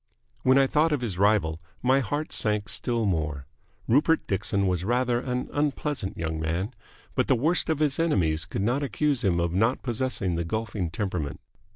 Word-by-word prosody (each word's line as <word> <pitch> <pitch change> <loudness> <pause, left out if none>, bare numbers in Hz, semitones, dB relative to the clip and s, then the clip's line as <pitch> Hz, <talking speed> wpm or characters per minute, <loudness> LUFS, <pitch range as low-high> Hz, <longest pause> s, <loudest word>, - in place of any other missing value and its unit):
When 130 +1 +4
I 135 - +6
thought 155 +4 +2
of 145 -4 0
his 100 -7 -3
rival 100 -6 +2 0.2
my 130 +2 +4
heart 145 +4 -2
sank 105 -2 +1
still 115 +4 -1
more. 75 -7 -1 0.4
Rupert 155 +6 +3
Dixon 100 0 0
was 90 -2 0
rather 120 +3 +1
an 125 0 -3
unpleasant 145 -6 -1
young 80 -1 -3
man, 85 +8 -2 0.4
but - - +1
the - - +4
worst 160 +10 +2
of 160 - +2
his 150 -2 0
enemies 80 - +1
could 95 - -3
not 125 +6 +1
accuse 145 -1 0
him 90 -4 +2
of 85 0 0
not 115 +7 +1
possessing 120 -6 -1
the 85 0 -1
golfing 105 0 -3
temperament. 90 -6 -3
110 Hz, 180 wpm, -26 LUFS, 90-135 Hz, 0.4 s, I